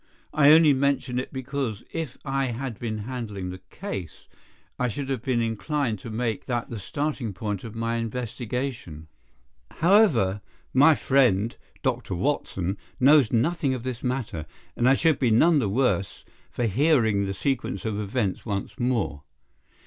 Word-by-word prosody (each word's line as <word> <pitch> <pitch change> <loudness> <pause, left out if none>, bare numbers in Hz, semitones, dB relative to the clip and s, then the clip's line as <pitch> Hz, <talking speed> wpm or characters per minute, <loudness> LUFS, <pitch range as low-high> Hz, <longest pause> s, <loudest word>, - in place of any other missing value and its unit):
I 145 -1 +6
only 155 -2 +7
mention 135 -2 0
it 130 - -5
because, 130 -4 -3
if 155 -6 -4
I 135 -1 0
had 125 -1 -4
been 110 -2 -3
handling 105 -5 -5
the 90 0 -9
case, 95 - -7 0.5
I 125 - +2
should 135 +3 -4
have 130 -4 -1
been 125 -2 0
inclined 115 +1 -1
to 115 - -8
make 115 -1 -2
that 120 -1 -2
the 115 - -4
starting 130 +2 -3
point 100 0 -4
of 115 -1 -8
my 115 +1 -1
investigation. 115 - -4 0.6
However, 155 - +3 0.3
my 145 +4 +6
friend, 120 -6 +2 0.3
Dr. 125 -7 -1
Watson, 95 -4 -1 0.2
knows 140 -2 +6
nothing 135 +3 +1
of 120 - -6
this 130 -2 -4
matter, 125 - -3 0.3
and 120 +2 +3
I 135 - +6
should 160 -1 +2
be 125 - +3
none 150 +8 +5
the 110 -7 0
worse 105 -4 0 0.2
for 120 - -3
hearing 110 - +2
the 95 - -2
sequence 120 -5 -2
of 105 -2 -2
events 105 -1 -1
once 100 +4 -4
more. 120 - 0
120 Hz, 155 wpm, -25 LUFS, 105-135 Hz, 0.6 s, only